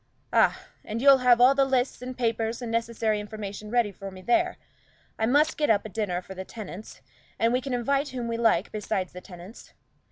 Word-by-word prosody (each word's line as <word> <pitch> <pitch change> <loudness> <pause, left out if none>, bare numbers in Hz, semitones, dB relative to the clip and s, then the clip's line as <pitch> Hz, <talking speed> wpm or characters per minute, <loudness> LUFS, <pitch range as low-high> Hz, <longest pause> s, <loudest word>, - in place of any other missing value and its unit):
"Ah, - - +3 0.2
and 220 +2 -4
you'll 275 +1 +7
have 250 -1 +5
all 250 +2 +7
the 275 0 +3
lists 260 -2 0
and 255 0 -7
papers 230 -1 -1
and 240 -2 -5
necessary 230 -2 0
information 210 0 -7
ready 235 -2 +1
for 195 0 -8
me 190 -1 -11
there. 350 - +1 0.6
I 220 - +1
must 295 +5 +3
get 300 - +1
up 215 -2 +3
a - - -6
dinner 190 -4 -2
for 190 - -9
the 190 0 -6
tenants, 210 0 -9 0.4
and 230 +1 +2
we 250 - +1
can 270 0 -4
invite 275 +4 0
whom 245 -2 -4
we 230 - -2
like 230 -1 +2
besides 195 -3 -3
the 180 - -9
tenants. 180 +3 -13
230 Hz, 210 wpm, -26 LUFS, 210-250 Hz, 0.6 s, you'll